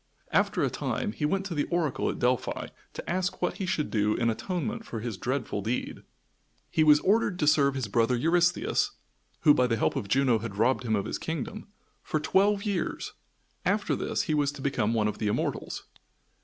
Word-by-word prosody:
After - - +2
a - - +1
time - - -2
he 150 - -2
went 195 +5 0
to 190 - -4
the 145 -2 0
oracle 155 -7 0
at - - -3
Delphi 125 0 0 0.2
to - - -8
ask 185 +2 -1
what - - -1
he 190 - -3
should 155 -4 -1
do 105 -1 +2
in 115 -1 +1
atonement 195 - -3
for 115 - -6
his 115 -1 -4
dreadful 125 -1 -2
deed. 115 +5 -3 0.7
He 160 - +3
was 150 -1 +7
ordered 205 -2 +2
to 150 - +1
serve 140 -2 +4
his 130 -5 -2
brother 115 +3 +2
Eurystheus 175 +6 +2 0.5
who, 150 - +7
by 125 -3 +3
the 115 -2 0
help - - +1
of 100 - -3
Juno, 125 0 +3
had 105 -2 -6
robbed 130 +3 +2
him 110 -2 +1
of 100 - -1
his - - -3
kingdom 165 - -4 0.3
for 155 - -1
twelve 200 +5 +2
years. 200 -5 -2 0.5
After - - +1
this - - -1
he - - -1
was 145 -2 +2
to 140 - -9
become 115 -5 +1
one 105 -2 +2
of 105 - -4
the 110 - -1
Immortals. 105 - -2
140 Hz, 200 wpm, -28 LUFS, 115-175 Hz, 0.7 s, was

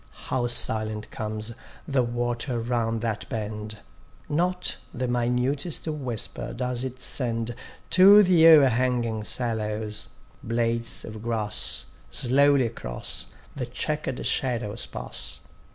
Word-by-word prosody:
How 125 -2 +1
silent 110 -2 0
comes 110 0 -4 0.4
the 140 -4 +2
water 120 +1 -1
round 115 -1 -1
that 115 -3 -3
bend; 105 -1 -4 0.5
Not 180 +4 0
the 125 +1 -3
minutest 125 +7 0
whisper 130 -8 -2
does 125 0 -1
it 130 -1 -5
send 115 -2 -1 0.4
To 200 +3 +9
the 175 -3 +6
o'erhanging 125 -6 +4
sallows: 110 -3 -1 0.3
blades 115 0 -1
of 110 -1 -8
grass 105 - 0 0.2
Slowly 135 - +3
across - - -4 0.3
the 125 -3 -3
chequer'd 150 +1 -3
shadows 120 -4 -1
pass. 60 +2 -4
120 Hz, 105 wpm, -26 LUFS, 110-130 Hz, 0.5 s, To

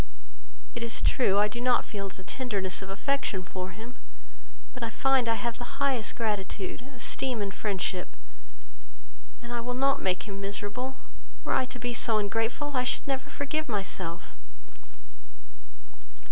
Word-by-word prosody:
It 240 - -4
is 235 0 +1
true, 200 -6 +4
I 205 +1 +6
do 235 +3 -4
not 250 0 +4
feel 200 -2 -3
the 190 - -10
tenderness 200 -5 -1
of 195 - -6
affection 200 -2 0
for 185 0 -4
him, 225 +6 -9 0.8
but 255 - -8
I 230 - 0
find 265 +1 +3
I 225 - +4
have 230 +2 -2
the 245 - -6
highest 270 -5 +2
gratitude, 210 -3 -1
esteem, 250 0 +1
and 200 -1 -1
friendship; 185 - -1 1.3
and 240 0 -5
I 235 - 0
will 245 +1 -2
not 275 +2 +3
make 185 -1 +2
him 200 -2 -5
miserable; 205 +6 -3 0.5
were - - +1
I 260 - +4
to 250 - -6
be 245 0 -2
so 225 -1 +3
ungrateful, 225 +7 0
I 250 - +4
should 250 - +2
never 270 -1 -1
forgive 310 +1 -1
myself." 190 -5 -2
225 Hz, 155 wpm, -30 LUFS, 195-250 Hz, 1.3 s, I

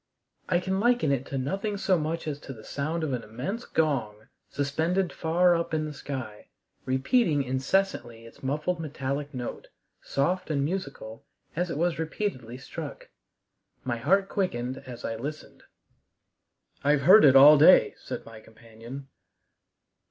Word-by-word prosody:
I 175 -2 +3
can 190 +1 -2
liken 240 -8 +2
it 135 -1 -1
to 135 - -4
nothing 195 +10 -2
so 190 -1 +2
much 160 0 -3
as 145 -2 -3
to 135 - -9
the 110 -3 -13
sound 155 +6 -3
of 145 -4 -1
an 125 - -2
immense 130 - -5
gong, 120 -10 -1 0.2
suspended 160 +6 -1
far 175 +2 +3
up 170 -1 -2
in 155 0 -1
the 150 - -6
sky, 130 -7 -7 0.4
repeating 145 - +2
incessantly 130 -3 -1
its 115 - -15
muffled 150 +6 -2
metallic 145 -2 -4
note, 125 -4 -6 0.3
soft 180 +7 -1
and 140 -3 0
musical, 145 - -5 0.3
as 175 +2 -1
it 155 - -3
was 170 0 0
repeatedly 155 - -4
struck. 130 - -8 0.7
My 120 -2 -2
heart 195 +11 +2
quickened 130 -11 -2
as 120 -2 -8
I 115 - -3
listened. 150 +6 -7 1.2
"I've 145 0 +3
heard 190 +10 +8
it 135 -2 +7
all 145 +2 +9
day," 165 +5 +7
said - - -7
my 115 -1 -11
companion. 115 +5 -11
145 Hz, 150 wpm, -27 LUFS, 130-175 Hz, 1.2 s, all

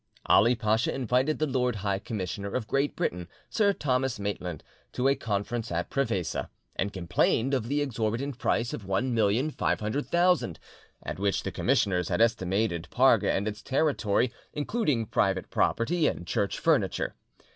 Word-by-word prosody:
Ali 115 +5 +5
Pacha 110 0 +1
invited 130 +3 +1
the 155 - +1
Lord 125 -4 0
High 100 -1 +1
Commissioner 100 -1 -4
of 120 -4 -2
Great 140 +5 0
Britain, 90 0 -2 0.2
Sir 205 -3 +3
Thomas 130 - -1
Maitland, 90 -5 -4 0.3
to 125 +1 +1
a 135 - +5
conference 115 -2 -3
at 85 +1 -2
Prevesa, 115 -11 -1 0.3
and 100 +1 -1
complained 100 +7 +1
of 125 -4 0
the 145 +3 +1
exorbitant 120 +1 -2
price 115 0 0
of - - -4
1,500,000, 120 - +1 0.5
at - - -5
which 100 0 0
the 95 - -3
commissioners 100 -10 +1
had - - 0
estimated 95 -5 +1
Parga - - +4
and 100 +2 0
its 105 0 -4
territory, 125 -5 +1 0.2
including 150 - 0
private 95 -2 0
property 155 +7 +1
and 85 - -3
church 100 +1 -1
furniture. 135 - +1
115 Hz, 145 wpm, -28 LUFS, 100-135 Hz, 0.5 s, Ali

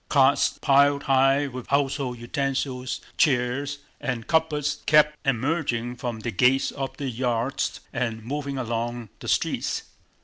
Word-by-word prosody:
Carts - - +4
piled 140 +1 +4
high 135 +1 +3
with 130 -3 -7
household 140 -2 0
utensils, 130 0 -2 0.2
chairs, 140 0 +1 0.2
and 125 -5 -3
cupboards 150 -2 0
kept 150 0 +5
emerging 125 -2 0
from 120 -2 -4
the 120 - -3
gates 135 +3 +3
of 135 -1 -5
the 140 - -3
yards 120 +1 -1
and 115 -3 -2
moving 140 +1 -3
along 120 -2 -3
the - - -9
streets. - - 0
135 Hz, 130 wpm, -25 LUFS, 120-140 Hz, 0.2 s, kept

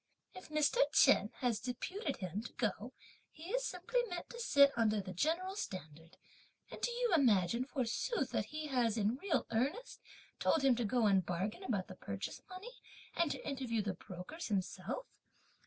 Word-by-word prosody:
If 370 - -11
Mr. 305 +8 +2
Chen - - +6
has 245 -4 +1
deputed 280 - -3
him 185 +2 -3
to 230 - -9
go, 230 +1 -2 0.4
he 330 +5 -9
is - - +1
simply 380 +8 -1
meant 350 -1 -5
to 475 - -8
sit 280 -11 +6
under 215 -2 +2
the 185 -1 -5
general's 360 - 0
standard; 165 -2 -8 0.5
and - - -8
do - - +1
you 485 0 0
imagine, 235 - +4
forsooth, 260 - -1
that - - 0
he 305 0 -5
has, 245 -6 +1
in 215 +3 +1
real 330 -3 0
earnest, 280 - -1 0.4
told 315 - +2
him 265 -2 +5
to 240 - 0
go 235 +2 +2
and 195 -3 +4
bargain 185 - -2
about 205 - -1
the - - -9
purchase 100 - -5
money, 410 +7 -9 0.3
and 340 -2 +2
to - - -5
interview 250 -6 -1
the 200 -2 -1
brokers 185 - -7
himself? 195 - -2
250 Hz, 170 wpm, -35 LUFS, 205-340 Hz, 0.5 s, Chen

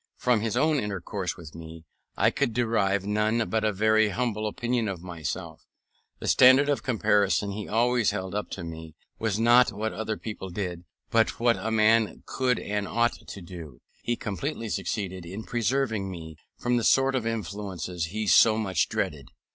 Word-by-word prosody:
From 125 -3 +2
his 115 +1 -1
own 155 +2 +3
intercourse 100 -2 -4
with 80 -4 -11
me 80 0 -10 0.3
I - - +4
could 115 - -1
derive 100 -5 +1
none 110 +2 +1
but 110 -1 +1
a 110 - +2
very 110 +1 +3
humble 110 0 -1
opinion 120 +1 -1
of 90 -4 -5
myself; 85 -4 -5 0.6
and - - -11
the - - -3
standard 130 +3 +6
of 145 - +1
comparison 105 -4 +1
he 105 +1 -5
always 120 0 +2
held 95 0 -4
up 105 0 -3
to - - -5
me, 80 -1 -8 0.2
was 110 -3 0
not 120 +2 +5
what 110 +1 -3
other 110 0 -3
people 105 -4 -6
did, 90 -2 -5 0.3
but 115 -2 +2
what 120 0 +3
a 100 +4 -3
man 110 0 +3
could 130 -1 0
and 105 -1 -3
ought 120 +3 +1
to 100 - -8
do. 85 -7 -10 0.2
He 120 - -1
completely 115 +3 -4
succeeded 95 -2 -3
in 95 +6 -7
preserving 115 -4 -1
me 80 -3 -8 0.2
from 120 0 0
the 120 - 0
sort 135 +3 +4
of 125 -4 -1
influences 95 -5 -4
he 105 +6 -4
so 110 +2 +6
much 95 -5 0
dreaded. - - -3
105 Hz, 180 wpm, -27 LUFS, 95-115 Hz, 0.6 s, standard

